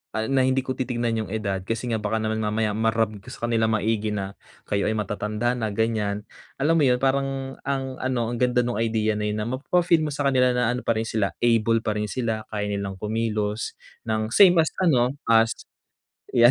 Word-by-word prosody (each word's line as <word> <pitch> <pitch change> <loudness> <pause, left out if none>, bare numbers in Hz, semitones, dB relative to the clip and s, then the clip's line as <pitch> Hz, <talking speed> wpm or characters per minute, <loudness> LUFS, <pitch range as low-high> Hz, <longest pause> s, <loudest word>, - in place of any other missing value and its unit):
Ah, 110 +2 -1
na 130 -1 +3
hindi 130 0 +2
ko 130 -1 -4
titingnan 120 -3 -1
'yong 95 - -11
edad 100 -3 -1
kasi 115 +3 -3
nga 115 - +1
baka 110 +1 -1
naman 110 0 -1
mamaya 110 0 0
ma-rub 110 -1 +1
ko 100 - -18
sa 120 -1 -4
kanilang 110 -1 +2
maigi 110 -1 0
na 100 -1 -4 0.3
kayo 100 -1 +1
ay 110 - +1
matatanda 105 +4 -1
na, 110 -2 -2
ganyan. 105 -2 0 0.4
Alam 165 +4 +3
mo - - +3
'yon, 125 0 +2
parang 135 0 0
ang 135 -1 -2
ano 125 -3 -1
ang 120 - -3
ganda 125 0 +3
no'ng 120 -2 -2
idea 110 -2 +1
na 105 - -1
'yon 105 0 -2
na 110 - -3
mapapa-feel 165 +5 +2
mo - - -3
sa 145 - -2
kanila 125 -1 +3
na 125 -2 +2
ano 125 - -4
pa 115 - +4
rin 110 - 0
sila 105 -3 0
able 115 -1 +3
pa 105 -1 -1
rin 105 - -1
sila, 110 -3 -2
kaya 105 -1 -2
nilang 100 -1 -3
kumilos 110 0 -2 0.3
ng 110 0 -1
same 185 +4 +7
as - - -1
ano 130 -9 +3 0.2
as 115 0 +5 0.8
'yan. 120 0 +7
115 Hz, 210 wpm, -24 LUFS, 110-125 Hz, 0.8 s, same